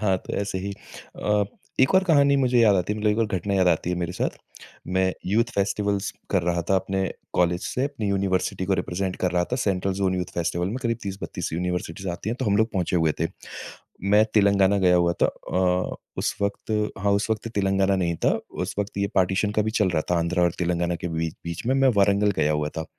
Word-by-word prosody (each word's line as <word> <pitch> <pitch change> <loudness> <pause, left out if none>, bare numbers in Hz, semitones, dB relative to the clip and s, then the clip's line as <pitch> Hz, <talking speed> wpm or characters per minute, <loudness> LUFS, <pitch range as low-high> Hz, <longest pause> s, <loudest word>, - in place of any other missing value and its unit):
हाँ, 95 -3 +2
तो - - -9
ऐसे 100 -2 -2
ही 100 +2 -4 0.5
अ, 105 -1 +2 0.4
एक 130 - +4
और 190 0 +5
कहानी 140 -5 +4
मुझे 125 -2 +2
याद 105 -3 +5
आती 90 +3 0
है 105 - -4
मतलब 105 0 +2
एक 105 - 0
और 115 - +2
घटना 100 0 -2
याद 95 -2 +4
आती 85 +1 +1
है 90 - -1
मेरे 85 0 -2
साथ। - - -2 0.6
मैं 95 0 +2
यूथ 110 +5 +3
फ़ेस्टिवल्स 100 0 0 0.2
कर 95 -3 +2
रहा 85 0 0
था 95 - +5
अपने 95 0 -1 0.3
कॉलेज 90 0 +2
से, 130 - -1
अपनी 140 -7 -3
यूनिवर्सिटी 95 -1 0
को 95 +1 +1
रिप्रेज़ेंट 95 +1 -2
कर 90 - 0
रहा 90 -1 +2
था। 125 - +2
सेंट्रल 95 -5 0
ज़ोन 95 -1 0
यूथ 90 -1 -1
फ़ेस्टिवल 85 +1 -1
में 115 - -3
करीब 115 -1 0
30-32 100 -4 -5
यूनिवर्सिटीज़ 90 +2 -3
आती 90 +4 -4
हैं 120 - -2
तो - - 0
हम 100 -1 +2
लोग 110 +2 +2
पहुँचे 90 -2 0
हुए 80 -2 +2
थे। 80 - +2 0.9
मैं 105 +1 +7
तेलंगाना 100 -1 +4
गया 90 -1 +4
हुआ 85 -1 +3
था। - - +7
अ, 90 0 -1 0.2
उस - - -1
वक़्त 100 +2 -2 0.3
हाँ, 100 0 +1
उस 100 +2 +1
वक़्त 110 +1 -1
तेलंगाना 95 0 +2
नहीं 85 -3 0
था, - - +5 0.2
उस - - -4
वक़्त 100 -1 -3
ये 100 0 +1
पार्टिशन 95 +2 +2
का 105 0 +1
भी 110 - -1
चल 105 -4 +2
रहा 80 -3 +1
था - - +3
आंध्र 85 +2 0
और 85 -1 +3
तेलंगाना 85 0 0
के 85 - -4
बीच 80 -1 -2
बीच 85 +5 -5
में, 130 - +2
मैं 135 0 +4
वारंगल 100 +1 +3
गया 75 0 +2
हुआ 75 0 0
था। 80 - -3
95 Hz, 230 wpm, -24 LUFS, 90-105 Hz, 0.9 s, मैं